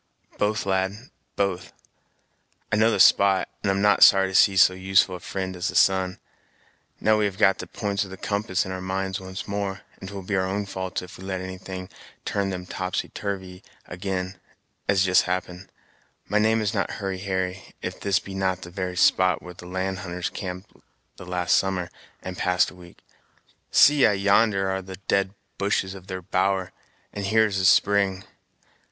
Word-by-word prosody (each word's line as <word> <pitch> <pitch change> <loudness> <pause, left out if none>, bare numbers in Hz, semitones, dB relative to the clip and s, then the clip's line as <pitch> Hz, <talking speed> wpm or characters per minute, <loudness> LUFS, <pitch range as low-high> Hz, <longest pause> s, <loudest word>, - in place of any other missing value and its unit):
"Both, 105 +1 0
lad, 95 +5 -2 0.2
both; 95 -3 -2 1.0
I - - +3
know 110 +1 +4
the 115 - 0
spot, 100 -1 +5
and 100 - -1
am 95 +1 +1
not 105 0 +4
sorry 95 -1 +7
to - - -8
see 95 0 +5
so 95 0 +6
useful 95 0 +2
a - - -7
fri'nd 95 0 -4
as 90 +1 -2
the - - -4
sun. 95 -1 +3 0.8
Now 110 0 +3
we 105 - +2
have 100 -2 -3
got 95 -3 +4
the - - -6
p'ints 100 -1 -2
of 95 - -10
the 95 - -9
compass 100 -1 -1
in 95 - -6
our 95 0 -5
minds 95 +1 -2
once 95 0 -7
more, 100 -1 -3 0.2
and 95 - -8
't 100 - -9
will 100 - -6
be 100 +2 -2
our 95 0 +1
own 100 +2 -2
faults 95 -1 -4
if 90 - -12
we - - -10
let 95 -1 -3
anything 95 0 -7 0.4
turn 100 -1 -1
them 90 -1 -5
topsy 95 0 -3
turvy 95 -2 -5 0.3
ag'in, 90 +1 -4 0.5
as 100 -2 +4
has - - +4
just 90 -1 +5
happened. 90 0 -4 0.6
My 105 +2 +2
name 110 +1 +3
is 105 +1 -1
not 100 -4 -1
Hurry 95 -2 -4
Harry, 95 -1 -2 0.2
if - - -5
this 100 -1 +1
be 100 - -6
not 95 -1 -1
the 85 - -9
very 90 -1 -4
spot 95 +1 +3
where 90 - -9
the 90 0 -12
land 95 +1 -3
hunters 90 -1 -4
camped 90 +1 -7 0.5
the 90 - -11
last 90 -1 +1
summer, 90 -2 0 0.3
and 90 -1 -6
passed 90 0 +2
a - - -15
week. 90 -1 -16 0.7
See 145 -2 +6
I - - +2
yonder 100 0 +3
are 95 0 -1
the 95 0 -9
dead 100 0 +1 0.2
bushes 100 -1 0
of 95 -1 -12
their 95 -1 -6
bower, 95 +1 0 0.4
and 100 - -5
here 110 +2 +4
is 100 -2 -1
the 95 - +1
spring. 95 0 +3
95 Hz, 195 wpm, -25 LUFS, 95-100 Hz, 1.0 s, sorry